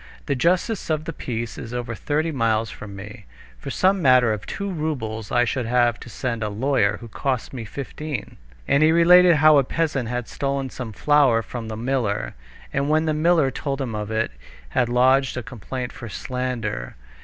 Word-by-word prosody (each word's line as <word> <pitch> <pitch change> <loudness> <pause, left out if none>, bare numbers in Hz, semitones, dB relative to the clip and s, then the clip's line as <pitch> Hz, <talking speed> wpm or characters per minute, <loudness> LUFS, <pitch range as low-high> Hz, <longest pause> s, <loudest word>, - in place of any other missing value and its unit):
The 140 - 0
justice 180 - 0
of 155 -1 0
the 165 - -4
peace 115 -4 -5
is 115 - -7
over 120 -1 -3
thirty 155 +7 -1
miles 115 -5 0
from 100 -2 -9
me. 105 +3 -10 0.3
For - - -7
some 190 +1 +2
matter 130 -5 +5
of 105 - -6
two 200 - -4
roubles 135 - -3
I 120 0 +3
should 125 -1 -2
have 120 -1 +2
to - - -10
send 120 -1 -3
a 105 - -1
lawyer, 105 -1 +1
who 120 - -9
costs 130 +3 -2
me 120 -4 -5
fifteen." 140 +2 -6 0.3
And 140 - +3
he 155 +1 +6
related 175 +1 +7
how 155 -1 +6
a - - +3
peasant 140 -4 -1
had 125 -1 -3
stolen 135 -1 -2
some 125 -3 -6
flour 135 -2 +3
from 115 -1 -6
the 110 -1 -5
miller, 115 - -1 0.4
and 140 +1 0
when 155 +1 +3
the 155 - +1
miller 155 -2 +3
told 140 0 -3
him 130 -5 -3
of 105 -1 -4
it, 110 - -1 0.4
had 120 - +1
lodged 130 +2 +3
a 125 - -3
complaint 125 +1 -6
for 120 - -8
slander. 125 - -4
130 Hz, 190 wpm, -23 LUFS, 115-150 Hz, 0.4 s, related